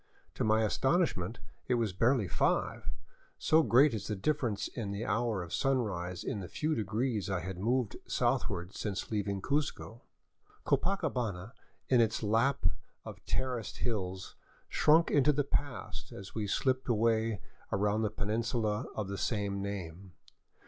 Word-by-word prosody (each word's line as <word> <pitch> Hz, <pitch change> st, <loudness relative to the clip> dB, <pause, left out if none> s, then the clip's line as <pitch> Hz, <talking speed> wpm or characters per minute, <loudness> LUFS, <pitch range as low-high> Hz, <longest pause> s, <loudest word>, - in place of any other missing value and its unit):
To -, -, -2 dB
my 110 Hz, +1 st, +3 dB
astonishment 115 Hz, -, +1 dB, 0.3 s
it 125 Hz, -, +3 dB
was 115 Hz, -5 st, 0 dB
barely 115 Hz, +2 st, +3 dB
five, -, -, 0 dB, 0.5 s
so 160 Hz, +1 st, +4 dB
great 135 Hz, +2 st, +5 dB
is 110 Hz, -, -3 dB
the 105 Hz, -, -1 dB
differ 140 Hz, +6 st, +1 dB
ence 105 Hz, -3 st, -2 dB
in 110 Hz, -4 st, -5 dB
the 100 Hz, +3 st, -3 dB
hour 110 Hz, -3 st, 0 dB
of. 85 Hz, -, -8 dB
sunrise 100 Hz, -10 st, 0 dB
in 105 Hz, -, -2 dB
the 90 Hz, -, -6 dB
few 155 Hz, -, -1 dB
degrees 110 Hz, -, -1 dB
I 95 Hz, -2 st, 0 dB
had 90 Hz, +1 st, -5 dB
moved 115 Hz, +1 st, 0 dB
south -, -, +1 dB
ward 90 Hz, +2 st, -5 dB
since 105 Hz, 0 st, -4 dB
leaving 100 Hz, -2 st, -1 dB
Cuzco. 145 Hz, -5 st, -1 dB, 0.6 s
Copacabana 125 Hz, -, 0 dB, 0.4 s
in 125 Hz, -2 st, +5 dB
its 115 Hz, 0 st, +1 dB
lap 115 Hz, +4 st, +2 dB, 0.4 s
of -, -, -9 dB
terraced 125 Hz, -4 st, -2 dB
hills 95 Hz, -5 st, -3 dB, 0.3 s
shrunk 160 Hz, +2 st, +4 dB
into 145 Hz, 0 st, +5 dB
the 145 Hz, 0 st, +1 dB
past 125 Hz, -9 st, -3 dB
as 95 Hz, -1 st, -9 dB
we 110 Hz, -2 st, -2 dB
slipped 130 Hz, +5 st, 0 dB
away 110 Hz, -2 st, +2 dB, 0.3 s
around 105 Hz, +2 st, +1 dB
the 110 Hz, -, +1 dB
peninsula 110 Hz, +1 st, -1 dB
of 105 Hz, -3 st, -2 dB
the 100 Hz, 0 st, -4 dB
same 100 Hz, -3 st, -1 dB
name. 95 Hz, -2 st, -6 dB
110 Hz, 150 wpm, -32 LUFS, 100-125 Hz, 0.6 s, great